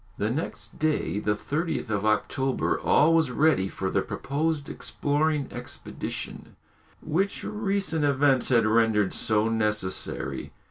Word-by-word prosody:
The 105 +2 0
next 150 +6 -5
day, 155 -9 0
the 105 0 0
30th 155 +1 -2
of 105 0 0
October, 130 +5 0
all 155 +3 +4
was 160 -4 +3
ready 135 -7 +3
for 95 0 -3
the - - +2
proposed 150 +1 -2
exploring 150 0 -1
expedition, - - -6 0.5
which 195 +6 -1
recent 200 -6 -1
events 140 -2 +3
had 115 -3 +4
rendered 110 -2 +3
so 110 0 +1
necessary. 105 -4 -2
135 Hz, 125 wpm, -26 LUFS, 110-155 Hz, 0.5 s, all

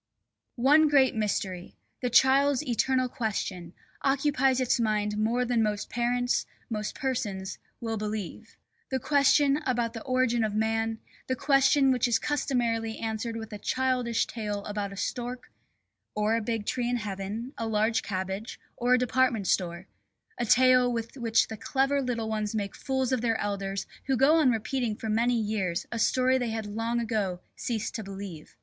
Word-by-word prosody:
One 290 +5 +5
great 275 -3 +4
mystery, 195 -4 -2 0.3
the 250 - 0
child's 265 +3 +4
eternal 255 0 +1
question, 190 -7 -3 0.3
occupies 270 -1 +2
its 255 -1 +1
mind 210 -2 0
more 230 +4 +1
than 240 -2 +1
most 210 -1 -1
parents, 245 +1 0 0.2
most 210 -1 -3
persons, 205 -8 -3 0.2
will 225 -1 -3
believe: 215 0 -5 0.3
the 265 - 0
question 285 +1 +4
about 240 -6 -1
the 225 - -6
origin 255 -2 +1
of 210 -1 -1
man, 225 +1 0 0.3
the 260 - 0
question 275 0 +4
which 250 -1 +2
is 235 -1 +3
customarily 235 -6 -1
answered 225 +1 -3
with 220 -1 -7
a 210 - -6
childish 255 -2 0
tale 210 -3 -4
about 205 -1 -3
a 195 - -9
stork 245 +3 -4 0.6
(or 210 +1 +2
a 230 - 0
big 225 -1 -2
tree 245 +1 -1
in 245 - +1
heaven, 210 +4 -5
a 225 - -3
large 220 +1 +1
cabbage, 190 +2 -4 0.2
or 245 +1 +3
a - - +3
department 250 -3 +1
store), 175 -2 0 0.5
a 240 - -1
tale 255 +1 +5
with 230 0 -4
which 230 -4 +2
the 220 - -7
clever 275 +4 +1
little 235 -4 -2
ones 215 -1 -2
make 200 -2 -2
fools 265 -1 -1
of 255 -3 +1
their 230 -2 +1
elders 195 -1 -3 0.2
who 265 -1 +2
go 290 +6 +5
on 305 -5 +4
repeating 235 0 -1
for 220 - -5
many 235 +2 +2
years 195 -5 -1
a 230 - -3
story 255 +3 +3
they 245 -2 -1
had 220 -1 -3
long 225 +3 -2
ago 210 -6 -1 0.2
ceased 225 -3 -3
to 220 - -4
believe. 195 -5 -8
230 Hz, 170 wpm, -28 LUFS, 210-255 Hz, 0.6 s, One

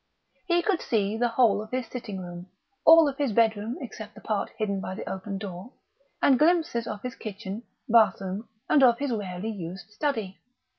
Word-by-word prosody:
He 345 -1 +3
could 390 -5 +1
see 210 -2 0
the 240 +2 +2
whole 230 -4 +3
of 215 - -9
his 255 0 -2
sitting 215 -6 -6
room, 175 0 -8 0.4
all 325 -1 +9
of 275 -1 -3
his 275 -6 +1
bedroom 225 +1 +2
except 220 -4 -8
the - - -12
part 210 -2 -1
hidden 200 -3 -1
by 185 - -5
the - - -7
open 195 +1 -4
door, 195 +4 -7 0.5
and 265 -3 +5
glimpses 315 -8 +2
of 210 -2 -5
his 250 0 -4
kitchen, 210 -2 -6 0.3
bathroom, 215 -2 +2 0.2
and 290 - +4
of 240 -3 +6
his 280 0 -2
rarely 205 -1 -3
used 185 0 -7
study. 215 -6 -2
220 Hz, 185 wpm, -27 LUFS, 195-250 Hz, 0.5 s, all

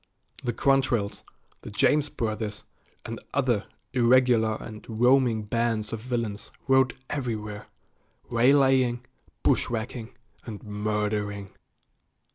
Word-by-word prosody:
The 120 - 0
Quantrells, 125 -5 +1 0.4
the - - -8
James 145 +8 +2
Brothers, 110 -2 -3 0.4
and - - -5 0.2
other 125 -7 +1 0.3
irregular 120 -3 +4
and 110 -2 -9
roaming 120 0 +3
bands 115 0 -1
of 115 - -3
villains 115 -3 -3 0.2
rode 130 -1 +4
everywhere, 105 -6 -4 0.6
waylaying, 130 0 +3 0.4
bushwhacking, 115 0 0 0.3
and 110 -4 -8
murdering. 105 -1 -2
115 Hz, 90 wpm, -27 LUFS, 105-125 Hz, 0.6 s, irregular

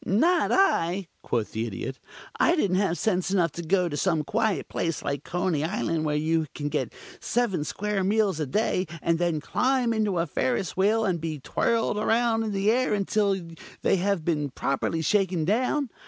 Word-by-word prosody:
"Not 325 - +2
I," 190 - +2
quoth 115 -3 -2
the 115 +1 -2
Idiot. 115 +5 -5 0.4
"I 340 - +4
didn't 195 - +1
have 190 -3 +1
sense 185 +1 0
enough 180 -4 +2
to 170 - -6
go 180 +2 +1
to 150 - -4
some 160 -1 +1
quiet 220 +5 0
place 165 -2 -2
like 140 0 -3
Coney 175 -3 -1
Island, 165 -2 -1
where 150 -1 0
you 160 +1 +1
can 145 -1 -3
get - - -2 0.3
seven 215 -10 0
square 200 +6 -2
meals 200 -3 +1
a 155 - -1
day, 190 +2 0 0.2
and 165 0 +1
then 170 -3 +1
climb 250 - +1
into 210 -4 0
a 170 - +1
Ferris 145 +3 -1
Wheel 215 +4 +2
and 175 -5 0
be 160 -2 -3
twirled 225 - 0
around 225 +1 +2
in 220 -1 -2
the 200 +2 +2
air 250 -2 +2
until 200 -1 +1 0.4
they - - +3
have 190 -3 0
been 150 -4 0
properly 140 +5 -1
shaken 185 -2 +1
down. 250 - 0
185 Hz, 185 wpm, -26 LUFS, 160-215 Hz, 0.4 s, I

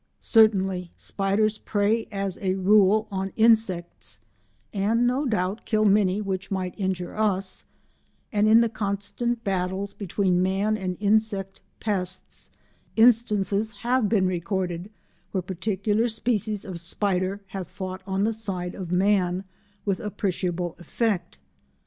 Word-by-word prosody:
Certainly 195 -5 +3
spiders 210 +2 0
prey 215 +2 0
as 195 -2 -3
a 190 -1 +1
rule 205 +2 +4
on 195 0 -2
insects 185 - +1 0.5
and 220 +4 +2
no 260 +4 +1
doubt 205 -2 -1
kill 215 -1 +1
many 200 -1 +3
which 190 -2 -3
might 185 -2 -2
injure 190 -3 -3
us, 195 -3 0 0.7
and 210 0 +3
in 225 +2 +7
the 235 - +3
constant 220 +3 -2
battles 190 +1 -2
between 190 -2 0
man 195 +3 +1
and 185 -3 -3
insect 205 -2 +1 0.2
pests, 185 -4 -3 0.5
instances 220 -3 +3
have 245 -3 +2
been 200 -4 +3
recorded 180 0 -2 0.4
where 190 -2 0
particular 205 +4 0
species 220 -2 -1
of 185 -3 -6
spider 190 +2 -1
have 190 -2 -5
fought 185 +1 -6
on 195 +1 0
the 225 +2 +1
side 190 -5 -3
of 180 -3 -6
man 185 -1 +2 0.4
with 195 -3 0
appreciable 180 -4 -2
effect. 180 0 -2
195 Hz, 125 wpm, -25 LUFS, 185-215 Hz, 0.7 s, in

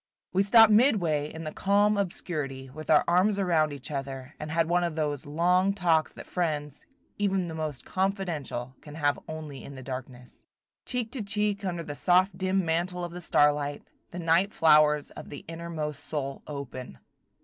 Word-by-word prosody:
We 190 - +4
stopped 225 +2 +7
midway 175 - +3
in 160 0 -7
the 155 - -4
calm 205 +4 +3
obscurity, 150 -9 -3
with 155 +3 -9
our 150 - +6
arms 185 +4 +3
around 165 -6 +2
each 140 0 -7
other, 135 0 -5
and 150 - -5
had 165 +1 +1
one 175 +1 +2
of 170 -3 -2
those 145 -3 -2
long 180 +6 +2
talks 165 -5 +2
that - - -10
friends, 150 -5 -3 0.4
even 195 -3 +1
the 165 - -6
most 155 -4 -4
confidential, 175 - -2
can 150 -1 -11
have 145 -2 +1
only 155 -4 -7
in 140 - -9
the 130 - -9
darkness. 125 -1 -8 0.5
Cheek 245 -3 -2
to 260 - -3
cheek 205 0 0
under 175 -3 -2
the 145 - -6
soft 180 +4 +3
dim 190 0 0
mantle 175 +2 -1
of 175 - -7
the 175 +1 -7
starlight, 145 -3 +2 0.3
the 175 - -8
night 170 +4 +2
flowers 150 -2 +4
of - - -10
the 145 - -9
innermost 165 -3 -5
soul 140 -3 -4
open. 130 - -7
160 Hz, 175 wpm, -28 LUFS, 145-185 Hz, 0.5 s, stopped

